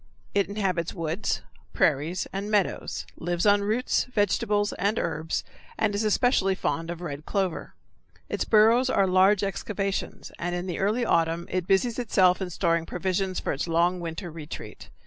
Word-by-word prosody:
It 200 -1 +1
inhabits 190 -5 -1
woods, 165 +3 -2 0.3
prairies, 155 +4 +1
and 200 +2 -3
meadows, 180 - 0
lives 175 +2 -1
on 205 0 +5
roots, 220 +5 +1
vegetables, 205 -2 +1
and 205 +3 0
herbs, 160 +1 -2 0.3
and 215 -2 +1
is 205 +2 0
especially 210 -3 +2
fond 165 -2 -2
of 175 0 -5
red 150 -4 -5
clover. 190 -4 -2 0.5
Its - - -1
burrows 230 +4 +5
are 200 -6 +3
large 190 +2 +4
excavations, 195 0 -3
and 175 +1 -2
in 175 +1 -3
the 180 -3 -4
early 215 +5 +1
autumn 165 -1 +1
it 185 -1 -1
busies 225 +5 +2
itself 190 -6 +3
in 185 - -2
storing 170 -1 0
provisions 185 +1 -1
for - - -2
its 140 +5 -3
long 170 +2 +2
winter 170 +1 -5
retreat. 155 -1 -9
190 Hz, 160 wpm, -26 LUFS, 170-205 Hz, 0.5 s, on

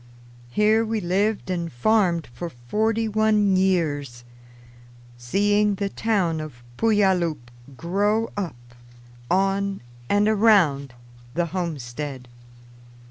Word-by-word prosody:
Here 215 - +3
we 225 0 -1
lived 200 +2 0
and 170 -2 -3
farmed 175 - +1
for 170 +7 -5
forty 215 - -1
one 215 -2 +2
years, 150 -10 0 0.9
seeing 205 +12 +1
the 200 0 -2
town 195 -8 0
of 125 -6 -10
Puyallup 185 - +1 0.3
grow 205 - 0
up 190 -9 -3 0.7
on 195 +1 +1 0.3
and 205 +1 +3
around 190 - +3 0.4
the 175 0 +1
homestead. 145 -6 -4
190 Hz, 95 wpm, -23 LUFS, 155-210 Hz, 0.9 s, Here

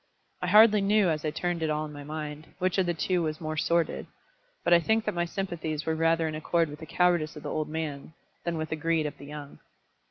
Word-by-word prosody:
I - - -1
hardly 215 -1 +7
knew 200 -1 +3
as 155 -2 -1
I 155 - 0
turned 175 +2 -2
it 160 - 0
all 155 0 0
in 150 - -9
my 145 0 -8
mind, 150 0 -6
which 185 +1 +1
of 185 - +2
the 175 - +1
two 180 +2 +1
was 155 -2 -1
the - - -12
more 155 0 -2
sordid; 170 +2 0 0.6
but 175 - +4
I 170 - +8
think 220 +5 +1
that 210 - 0
my 175 -1 0
sympathies 165 -5 -3
were 160 - +1
rather 165 0 +2
in 155 - -3
accord 165 +1 +1
with 150 +1 -9
the 160 - -9
cowardice 175 -3 +2
of 150 - -9
the - - -4
old 155 -1 -2
man 155 -2 -4 0.3
than 170 -1 -2
with 155 0 -3
the - - -1
greed 165 0 +1
of 150 - -5
the 140 - -10
young. 145 -1 -9
160 Hz, 255 wpm, -28 LUFS, 155-175 Hz, 0.6 s, I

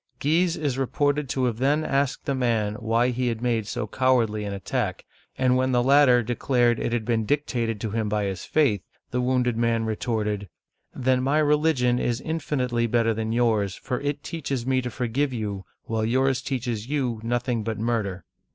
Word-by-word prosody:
Guise 165 +4 +2
is 140 -4 -1
reported 145 +1 0
to 130 -1 -1
have 120 -3 0
then 145 +4 +2
asked 140 -1 0
the 140 - 0
man 115 -5 0
why 115 +2 +2
he 125 0 -1
had 115 -2 -1
made 115 -3 0
so 105 - -3
cowardly 115 -2 +1
an 100 - -3
attack, 100 -1 -3 0.3
and 130 -1 +3
when 130 0 +1
the 120 0 +3
latter 130 -2 +5
declared 120 0 +1
it - - -1
had 120 -2 -1
been 115 -1 +1
dictated 120 -4 -1
to 110 -1 -3
him 110 -1 -1
by 105 0 0
his 95 -3 -3
faith, 130 - +2 0.3
the 125 - 0
wounded 125 -1 +1
man 115 -1 +1
retorted: 105 -3 -2 0.2
" - - -40
Then 130 -1 +3
my 140 +4 +1
religion 150 -5 +2
is 120 -1 0
infinitely 130 -7 -1
better 115 0 +2
than 110 0 -3
yours, 110 -5 +1
for 125 - -4
it 145 0 -2
teaches 140 -7 -3
me 130 0 +2
to 125 - -4
forgive 125 +4 -1
you, 105 -4 -4 0.2
while 110 -1 -2
yours 130 +3 +1
teaches 120 -4 -3
you 130 -6 -1
nothing 120 0 -1
but 110 -1 -3
murder! 105 -6 -2
120 Hz, 190 wpm, -25 LUFS, 110-135 Hz, 0.3 s, latter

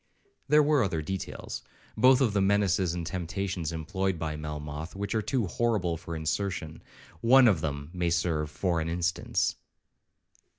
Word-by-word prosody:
(There 150 0 +6
were 145 -2 +3
other 80 -6 -1
details, 95 +4 -5 0.3
both 130 +1 +5
of 115 -6 +2
the 100 - +2
menaces 95 -3 +2
and 85 -1 -3
temptations 90 -1 -3
employed 95 +3 -2
by 80 -1 -3
Melmoth, 75 +2 -6
which 100 +1 -3
are 110 - +1
too 110 +2 0
horrible 95 -4 0
for 85 +1 -7
insertion. 80 0 -3 0.4
One 130 +2 +6
of 95 -8 +3
them 70 0 -4
may 90 -1 0
serve 85 -3 0
for 85 +1 -1
an 80 - -2
instance). 85 0 0
90 Hz, 155 wpm, -28 LUFS, 80-100 Hz, 0.4 s, There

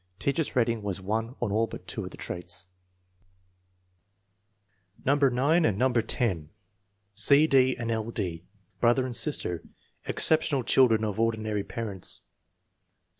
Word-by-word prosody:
Teacher's 140 +7 -2
rating 115 -2 +1
was 100 -2 -3
1 110 +6 -3
on 115 -4 -2
all 110 +2 +1
but - - -10
two - - -5
of - - -6
the - - -13
traits. 90 0 -3 2.4
No. 135 - +4
9 140 +4 +2
and 105 -8 +1
No. 130 +2 +2
10. 110 - -1 0.6
C. 140 +9 +6
D. 130 -3 +3
and 115 -1 -3
L. 110 0 -2
D. 90 -8 -4 0.4
Brother 120 +2 +3
and 125 -2 -4
sister. 90 - 0 0.4
Exceptional 155 -4 +2
children 115 -3 +3
of 105 -1 -4
ordinary 110 -2 -1
parents. 105 -6 -3
115 Hz, 130 wpm, -27 LUFS, 105-130 Hz, 2.4 s, C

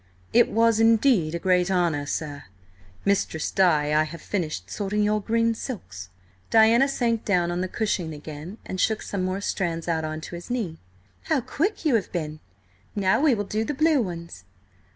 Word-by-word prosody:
"It 240 0 +5
was 230 0 +3
indeed 225 - +4
a - - 0
great 180 +1 +2
honour, 170 -6 +1
sir. 145 -1 -4 0.6
Mistress 200 -5 0
Di, 150 -6 +3
I 155 - +4
have 160 +2 -7
finished 155 - -3
sorting 205 - -1
your 210 0 +1
green 230 +2 +1
silks." 105 - -7 0.4
Diana 225 +4 +5
sank 235 -5 0
down 175 -4 +1
on 175 +1 -2
the 185 - -1
cushion 185 -5 -2
again, 155 +5 -8
and 185 - -3
shook 220 -1 +1
some 200 - -3
more 185 +2 -2
strands 170 -5 -2
out 160 -2 0
on 155 0 -4
to 155 - -9
his 175 +4 -8
knee. 215 -10 -3 0.5
"How - - +2
quick 330 - -2
you 300 - +3
have 220 -4 +1
been! 155 -3 -4 0.6
Now 195 +3 +2
we 295 -5 +4
will 205 - -2
do 215 +2 -2
the 295 +5 -3
blue 310 -1 +3
ones." 170 - -6
190 Hz, 180 wpm, -25 LUFS, 165-225 Hz, 0.6 s, It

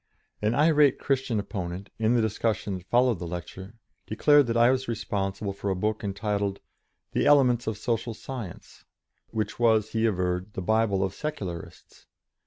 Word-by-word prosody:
An 105 +3 +1
irate 150 -2 +4
Christian 130 -5 0
opponent, 95 -1 -5
in 110 +2 +2
the 115 - +3
discussion 105 -2 -1
that 90 - -20
followed 120 -4 +3
the 85 - -5
lecture, 95 +4 -7 0.3
declared 145 +5 +4
that 115 0 0
I 120 +2 +6
was 130 0 -1
responsible 100 -3 -2
for 100 +1 -4
a 95 - 0
book 105 +4 -1
entitled, 100 0 -2 0.5
"The - - +1
Elements 125 -5 +4
of 110 -2 -2
Social 115 +1 -2
Science," 120 -7 -8 0.5
which 110 0 -3
was, 110 -2 +3
he 115 0 +2
averred, 90 0 -1
"The - - -4
Bible 110 -1 +2
of 95 0 -2
Secularists." 95 - -7
110 Hz, 160 wpm, -27 LUFS, 95-120 Hz, 0.5 s, I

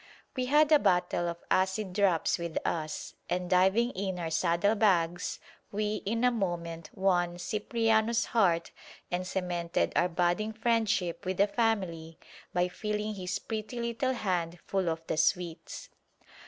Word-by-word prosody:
We 255 -1 -1
had 300 +3 +4
a 300 - +8
bottle 175 -3 +1
of 170 0 -7
acid 190 +1 +1
drops 185 -4 +2
with 170 -1 -4
us, 155 -2 -3 0.2
and 180 0 -1
diving 190 +7 +3
in 190 -3 -3
our 165 -2 -3
saddle 170 +5 +2
bags 180 -5 +1 0.3
we 210 +1 -1
in 230 +3 0
a 250 - +5
moment 170 -7 -3
won 175 -2 +1
Cipriano's 220 +4 +1
heart 175 -7 +2 0.4
and 180 +1 -2
cemented 175 -2 -1
our 175 - +3
budding 175 +5 0
friendship 220 -6 0
with 185 -1 -2
the 200 - +5
family 190 -8 -1 0.3
by 180 0 +1
filling 210 +3 -3
his 185 -2 -3
pretty 220 +2 -5
little 235 +3 -1
hand 175 -7 -1
full 190 -3 0
of 160 0 -4
the - - -2
sweets. 170 +1 -1
185 Hz, 145 wpm, -30 LUFS, 175-215 Hz, 0.4 s, a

